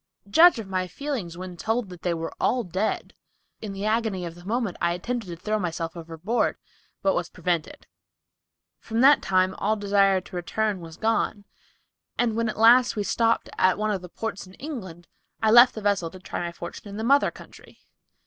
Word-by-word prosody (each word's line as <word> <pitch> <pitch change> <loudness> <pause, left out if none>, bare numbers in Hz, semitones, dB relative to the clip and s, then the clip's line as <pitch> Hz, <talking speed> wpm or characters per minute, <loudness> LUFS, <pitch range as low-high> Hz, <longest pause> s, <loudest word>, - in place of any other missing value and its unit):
Judge 320 - +7
of 220 -3 -6
my 185 -1 -1
feelings 210 - -5
when 185 0 -7
told 225 +3 -2
that 180 -2 -11
they 175 -2 0
were 165 0 -5
all 250 -1 +2
dead. 190 +3 -2 0.5
In 215 - -5
the 195 +1 -5
agony 215 -4 0
of 170 - -6
the 175 +1 -14
moment, 220 -1 -2
I 170 0 +2
attempted 230 +4 -4
to 175 - -6
throw 215 +5 -2
myself 165 -2 -3
overboard, 170 +7 -2 0.5
but 195 - +3
was 175 -1 -2
prevented. 175 -2 -3 0.9
From 225 +1 -2
that 280 +2 +7
time 185 0 +2
all 215 +2 +1
desire 200 -2 +3
to 185 0 -12
return 205 +3 -1
was 165 -1 -10
gone, 220 -2 0 0.7
and 235 -2 +1
when 230 0 0
at - - -5
last 240 +3 +6
we 210 - -1
stopped 230 +2 +1
at 185 -1 +4
one 215 0 0
of 195 -3 -2
the 180 - -10
ports 210 0 -5
in 185 - -15
England, 190 - -8 0.3
I 220 -1 +2
left 240 +2 +8
the 220 - -5
vessel 200 -5 +1
to 185 - -12
try 185 - -5
my 175 0 -3
fortune 170 +4 -9
in 200 0 -7
the 220 - -3
mother 280 +4 +4
country." - - -15
200 Hz, 195 wpm, -25 LUFS, 180-225 Hz, 0.9 s, left